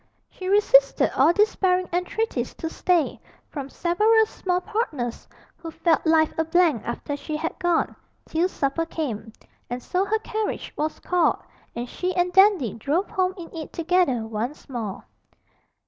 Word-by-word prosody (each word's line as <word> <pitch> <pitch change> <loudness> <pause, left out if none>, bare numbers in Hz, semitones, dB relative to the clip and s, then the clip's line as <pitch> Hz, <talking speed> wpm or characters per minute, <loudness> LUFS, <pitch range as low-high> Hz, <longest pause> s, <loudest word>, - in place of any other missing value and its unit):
She 370 - -7
resisted 280 -9 +4
all 275 +5 +5
despairing 370 -2 +2
entreaties 360 +6 -2
to 325 - -4
stay, 350 -5 +1 0.3
from 280 -3 -5
several 425 +9 +3
small 360 -4 -2
partners 360 - -3 0.3
who 335 -1 -8
felt 325 0 +1
life 320 -1 +4
a - - +4
blank 320 - +2
after 260 +4 -3
she 300 +1 -4
had 325 +3 -4
gone 350 -2 +1 0.3
till 340 +3 0
supper 310 +1 -1
came; 235 -10 -4 0.4
and 245 0 -4
so 365 +1 0
her 430 +2 +1
carriage 435 0 -4
was 310 +1 -2
called, 355 -2 +2 0.4
and 240 +1 -4
she 365 +8 -3
and 360 0 +1
Dandy 385 - +5
drove 290 - -1
home 370 0 0
in 335 -1 -10
it 315 -2 -6
together 335 -9 +1
once 225 +6 -5
more. 225 -8 -5
335 Hz, 150 wpm, -24 LUFS, 275-370 Hz, 0.4 s, all